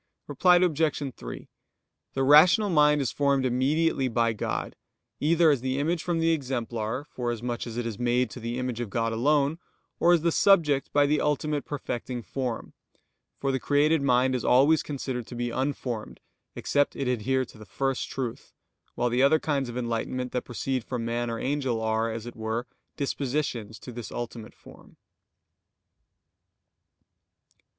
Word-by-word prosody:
Reply 180 -1 +4
Obj. 155 -6 +1
3: - - -8 0.7
The 135 - +1
rational 175 +9 +6
mind 150 -2 +4
is 125 - -1
formed 140 -2 +1
immediately 135 +3 +1
by 115 -1 +1
God, 105 - -3 0.4
either 165 +1 +4
as 140 -5 0
the 130 +1 -1
image 160 +4 0
from 175 -1 -1
the 165 0 +2
exemplar, 125 -4 -2
forasmuch 120 -1 -3
as 115 0 -6
it 120 - -2
is 115 -2 -5
made 120 -1 +1
to - - -8
the 120 +1 -4
image 125 -2 -3
of 120 -3 -3
God 115 +2 -1
alone; 145 +6 +2 0.4
or 175 - +5
as 165 -2 +2
the 170 - +3
subject 160 -8 +3
by 145 0 +4
the 150 +1 +1
ultimate 150 0 0
perfecting 125 -4 -4
form: 125 -3 -4 0.6
for 135 - -1
the 130 - -1
created 150 +3 +2
mind 130 -1 +3
is 125 - -1
always 140 +5 +5
considered 130 -4 -4
to 125 - -8
be 120 0 -2
unformed, 130 -4 -3 0.4
except 145 0 +1
it 135 - -2
adhere 130 +2 0
to 110 - -16
the - - -10
first 135 +5 -2
truth; 125 -4 -5 0.4
while 120 0 0
the 125 +2 +2
other 140 +4 +5
kinds 140 -5 -1
of 120 - -6
enlightenment 125 +1 -2
that 125 - -2
proceed 130 +1 -2
from 120 -1 -4
man 120 +1 -1
or 115 - -3
angel, 130 -3 -1
are, 110 +1 0
as 110 0 -5
it 120 - -8
were, 110 +2 -3 0.3
dispositions 135 -6 -2
to 125 - -10
this 120 -1 -7
ultimate 115 -2 -6
form. - - -17
130 Hz, 165 wpm, -27 LUFS, 120-145 Hz, 0.7 s, rational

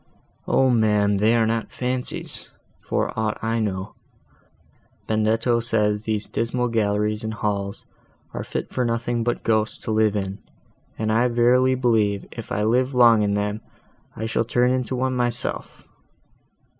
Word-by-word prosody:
"O 130 -1 +3
ma'am! 105 -3 +3
they 110 +4 +3
are 115 -1 +3
not 115 0 -1
fancies, 125 0 -3 0.3
for - - -2
aught 110 -1 -1
I 115 +1 0
know; 95 -3 -3 1.1
Benedetto 115 +2 +1
says 105 -2 0
these 110 -1 -2
dismal 120 +1 -1
galleries 105 -1 0
and 110 0 -3
halls 100 -1 -3 0.5
are - - -4
fit - - -5
for 125 - 0
nothing 115 0 -1
but 120 +1 -2
ghosts 110 -1 +1
to - - -3
live 110 -1 +2
in; 95 0 -3 0.6
and 110 0 -1
I 115 +3 +3
verily 125 +2 +3
believe, 110 -5 +1
if 115 +1 -9
I 105 -4 0
live 125 +4 +1
long 120 -3 +6
in 100 -1 +1
them 105 +1 -2 0.5
I 110 - -4
shall 110 +1 0
turn 125 +2 +1
to 130 - -3
one 130 +1 -1
myself!" 120 -2 -3
110 Hz, 150 wpm, -23 LUFS, 105-120 Hz, 1.1 s, long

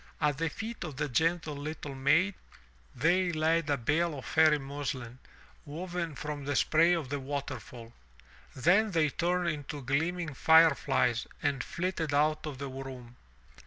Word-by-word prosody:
At 150 -2 +1
the 165 0 0
feet 225 +6 -6
of 155 -5 -6
the 150 +2 -2
gentle 160 +3 0
little 145 0 -6
maid 160 +9 +3 0.6
they 175 +2 +2
laid 160 0 +1
a 145 - +2
bale 150 +6 0
of 130 - -8
fairy 155 -1 +4
muslin, 135 -3 -5 0.4
woven 170 +1 -5
from 150 0 -5
the 145 0 -1
spray 165 +5 +4
of 160 -7 -2
the 145 0 -2
waterfall. 135 -4 -6 0.6
Then 180 - +3
they 165 -5 +2
turned 175 +2 0
into 145 -2 -5
gleaming 160 +5 -1
fire 160 +3 +6
flies 125 -4 0 0.2
and 140 -3 0
flitted 170 -4 -2
out 155 +1 +1
of 145 -3 -6
the 140 +1 -5
room. 130 -2 -9
150 Hz, 155 wpm, -30 LUFS, 140-165 Hz, 0.6 s, fire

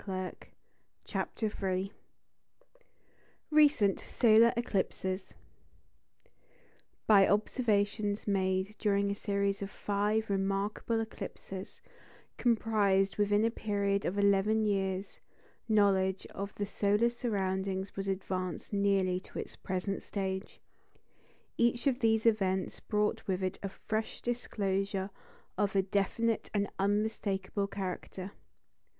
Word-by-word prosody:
] - - -43
CHAPTER 220 -2 -2
III 190 +1 -1 1.6
RECENT 290 -10 +5
SOLAR 230 0 +5
ECLIPSES 190 -4 -2 1.7
By 200 -3 +7
observations 205 -1 +1
made 190 0 0
during 200 -1 +2
a - - +1
series 200 -1 -1
of 195 - -3
five 210 +2 0
remarkable 200 +3 0
eclipses, 195 -3 -7 0.5
comprised 210 -5 +2
within 205 +1 +3
a 230 - +2
period 200 -3 0
of 190 - -1
eleven 200 +2 +3
years, 195 -1 -1 0.5
knowledge 195 -3 +3
of 200 +1 -6
the 205 - -2
solar 210 +3 +2
surroundings 195 -4 -2
was 195 0 -3
advanced 185 -1 -3
nearly 195 -2 +2
to - - -12
its - - -6
present 190 +1 -3
stage. 190 -1 -4 1.0
Each 235 +2 +2
of 265 -3 +2
these 220 -2 +2
events 190 -4 +1
brought 210 0 -1
with 190 -1 -1
it 185 0 -2
a 195 - -3
fresh 215 +3 -3
disclosure 195 -5 -2 0.5
of 205 -1 +1
a 195 - +4
definite 205 +4 0
and 200 0 +2
unmistakable 200 -1 0
character. 190 0 -5
200 Hz, 105 wpm, -32 LUFS, 195-215 Hz, 1.7 s, By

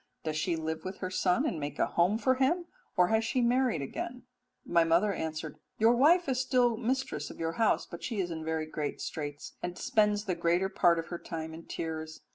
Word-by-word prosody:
Does 155 -1 -2
she 165 +2 0
live 160 0 -3
with 190 0 -5
her 185 -1 -4
son 180 -1 +2
and 165 - -1
make 145 -1 -4
a - - +3
home 180 +5 +2
for 260 +3 +3
him, 285 +7 +1 0.3
or 180 0 +5
has 220 0 +3
she 240 +3 0
married 245 - +2
again?' 250 - -5 0.4
"My 170 -1 +4
mother 170 +5 +3
answered, 155 -2 -4 0.2
'Your 225 +2 +5
wife 330 +7 +5
is 260 -2 +1
still 250 -2 +3
mistress 260 +4 -2
of - - -11
your 165 0 -1
house, 220 - +3
but 170 - -10
she 225 -5 -3
is 175 -2 -1
in 160 -1 -4
very 160 0 -1
great 155 -1 -4
straits 145 -2 -5
and 175 0 -4
spends 210 -1 +2
the 190 - 0
greater 175 +2 +1
part 170 -3 +4
of 165 - -4
her 175 - -4
time 160 -1 -6
in 165 +1 -10
tears. 160 -1 -5
180 Hz, 220 wpm, -30 LUFS, 160-235 Hz, 0.4 s, or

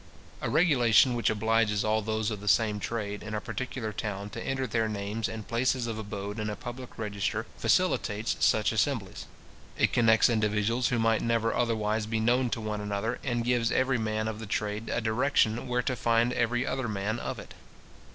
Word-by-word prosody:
A - - -1
regulation 130 -7 +4
which 120 -3 +1
obliges 110 -1 +1
all 110 0 +2
those 110 +1 -1
of 105 -2 -5
the 105 - -9
same 105 0 +3
trade 105 -1 -4
in 110 0 -5
a - - 0
particular 115 0 -4
town 100 -1 -4
to - - -6
enter 135 0 -1
their 115 -3 0
names 105 +1 -3
and 110 -1 -7
places 125 +1 +1
of 115 -2 -4
abode 100 0 -5
in 105 0 -2
a 105 - -3
public 125 +2 -8
register, 100 -3 -2
facilitates 105 +2 +1
such 110 -1 +3
assemblies. 110 -3 -1 0.5
It - - +2
connects 110 -2 +5
individuals 110 +1 +1
who 125 - 0
might 115 -1 +2
never 115 -1 +1
otherwise 110 -2 0
be 110 0 -1
known 120 +3 +2
to 115 - -2
one 105 -1 -3
another, 105 +2 -2
and 120 -3 -1
gives 120 -1 +1
every 130 -1 +2
man 110 0 -1
of 110 -1 -4
the 110 - -7
trade 105 +2 -2
a 115 - -1
direction 115 0 +1
where 125 0 0
to 130 - -1
find 115 +1 +2
every 120 +2 0
other 130 -2 -2
man 105 +2 -2
of - - -4
it. - - -10
110 Hz, 190 wpm, -28 LUFS, 105-120 Hz, 0.5 s, connects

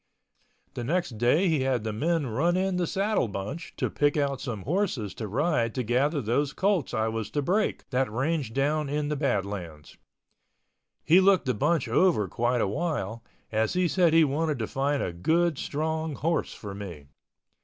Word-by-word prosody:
The 120 - -5
next 150 -5 -1
day 150 +11 +3
he 160 -4 +2
had 130 -4 0
the 110 -1 -3
men 160 +6 0
run 150 +10 +1
in 190 -1 0
the 175 -2 0
saddle 200 - 0
bunch 105 - -6
to - - 0
pick 145 0 +1
out 140 -2 0
some 115 -8 -5
horses 150 - -1
to 110 - -5
ride 120 - 0
to 125 - -1
gather 135 +6 +1
those 135 +6 0
colts 195 -7 +1
I 110 0 +1
was 110 -1 -3
to 145 - -1
break 205 +8 0
that 130 -3 +1
ranged 135 0 -1
down 145 +2 +1
in 145 0 -1
the 150 - 0
Badlands. 100 - -3 1.1
He 170 +4 +6
looked 195 -1 +4
the 130 - +1
bunch 150 +5 +1
over 115 - +3
quite 120 +5 0
a - - +1
while, 140 - -3 0.3
as 110 0 +1
he 180 0 +2
said 175 -1 +3
he 165 - +7
wanted 150 +1 0
to 110 - -2
find 140 +1 0
a 90 - -3
good 160 - +1
strong 160 +1 -2
horse 165 +3 -1
for 100 -2 -7
me. 90 -8 -8
140 Hz, 185 wpm, -27 LUFS, 115-165 Hz, 1.1 s, he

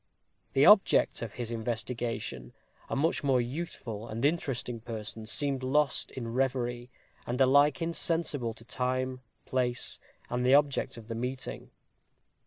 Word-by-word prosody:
The 135 - +5
object 210 +1 +6
of 115 -3 -5
his 120 -2 -5
investigation, 115 - -3 0.4
a - - -1
much 150 +4 +1
more 135 -3 +3
youthful 120 -5 -4
and 115 +3 -2
interesting 135 -6 0
person, 110 -1 -7
seemed 140 +2 0
lost 140 +1 +1
in 115 -3 -6
reverie, 125 -2 -1 0.4
and 120 +2 -2
alike 140 +4 +5
insensible 165 -8 -1
to 115 - -15
time, 130 +1 -2 0.2
place, 125 -2 -1 0.3
and 125 +1 -1
the 130 +2 +6
object 140 -3 +2
of 110 -2 -11
the 115 - -4
meeting. 125 +3 -4
125 Hz, 135 wpm, -30 LUFS, 115-135 Hz, 0.4 s, object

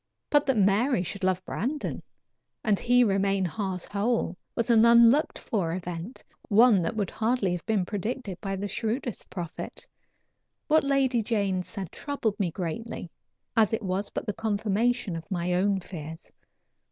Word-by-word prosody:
But 290 -1 +4
that 265 -4 +2
Mary 200 +2 +3
should 200 +2 -6
love 185 0 +1
Brandon, 280 +8 -3 0.6
and 210 -3 +2
he 245 +1 +4
remain 195 -2 +2
heart 190 0 -3
whole, 205 -2 -1 0.2
was 235 0 +1
an 225 -1 +6
unlooked 235 +5 +6
for 175 -6 -2
event 180 +5 -6 0.3
one 220 -2 +6
that 170 - -2
would 205 -4 -1
hardly 225 -4 0
have 175 -1 -3
been 210 -5 +1
predicted 205 0 -4
by 195 -1 -2
the 200 +2 -3
shrewdest 230 +2 -3
prophet. 175 -4 -6 0.8
What 315 +1 +4
Lady 270 -3 +2
Jane 200 -4 0
said 185 -1 -7
troubled 240 -7 -3
me 190 -4 +1
greatly, 175 +2 -5 0.4
as 225 -1 +4
it 225 - -1
was 190 +1 -2
but - - -4
the 210 - -2
confirmation 215 0 0
of 165 -1 -8
my 180 -1 -1
own 195 +2 +2
fears. 160 -3 -9
205 Hz, 155 wpm, -27 LUFS, 185-235 Hz, 0.8 s, an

